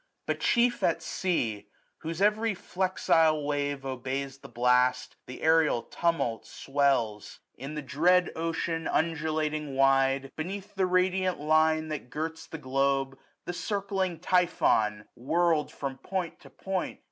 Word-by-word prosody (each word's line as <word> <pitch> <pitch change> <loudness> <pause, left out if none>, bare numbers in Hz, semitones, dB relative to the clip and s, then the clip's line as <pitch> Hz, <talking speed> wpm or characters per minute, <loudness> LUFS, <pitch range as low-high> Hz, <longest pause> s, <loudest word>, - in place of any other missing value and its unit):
But - - -2
chief 240 0 +2
at - - +1
sea, 110 - -2 0.3
whose 165 +4 -3
every 215 0 +2
flexile 165 -5 +1
wave 145 -1 -2
980 - - -5
Obeys 135 +1 -4
the - - -12
blast, 125 +1 +2
the 130 - -9
aerial 160 -6 +3
tumult 165 -10 -1
swells. 135 -7 -1 0.2
In 140 +3 -7
the 150 - -4
dread 175 +6 +3
ocean, 165 0 -2
undulating 155 -2 -1
wide. 135 0 +3
Beneath 190 +5 -5
the 190 -2 +1
radiant 185 0 +1
line 155 +1 +2
that 150 -5 -5
girts 160 +2 -5
the 160 - -7
globe. 135 -1 0 0.3
The 175 - -4
circling 195 -2 -2
Typhon, 155 - +2
whirlM 160 +3 +1
from 135 -2 -6
point 185 -3 -4
to - - -15
point. 190 -2 -4
155 Hz, 135 wpm, -28 LUFS, 135-175 Hz, 0.3 s, aerial